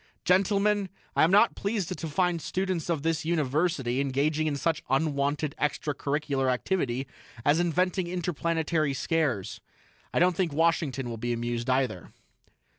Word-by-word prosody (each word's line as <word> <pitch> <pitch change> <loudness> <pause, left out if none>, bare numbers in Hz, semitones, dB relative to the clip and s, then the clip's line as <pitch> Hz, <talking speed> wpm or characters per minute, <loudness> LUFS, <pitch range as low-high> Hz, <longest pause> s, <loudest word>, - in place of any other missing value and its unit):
"Gentlemen, 200 +2 +2 0.3
I - - +4
am 160 - +5
not 205 +5 +5
pleased 200 -3 -2
to 165 - -5
find 175 +2 0
students 185 -2 -2
of 160 -4 0
this 165 -1 0
University 150 -4 0
engaging 145 +3 0
in 145 - 0
such 160 +2 0
unwanted 145 +1 0
extra 150 0 -1
curricular 140 -2 -1
activity 130 -2 -1 0.4
as 145 +3 +4
inventing 180 +1 +1
interplanetary 165 -4 -1
scares. 120 - -1 0.5
I - - -2
don't 180 0 +4
think 175 -4 0
Washington 150 -5 +1
will 115 -1 -5
be 120 +2 -2
amused, 120 +1 -3
either." 130 -8 0
155 Hz, 140 wpm, -28 LUFS, 135-175 Hz, 0.5 s, am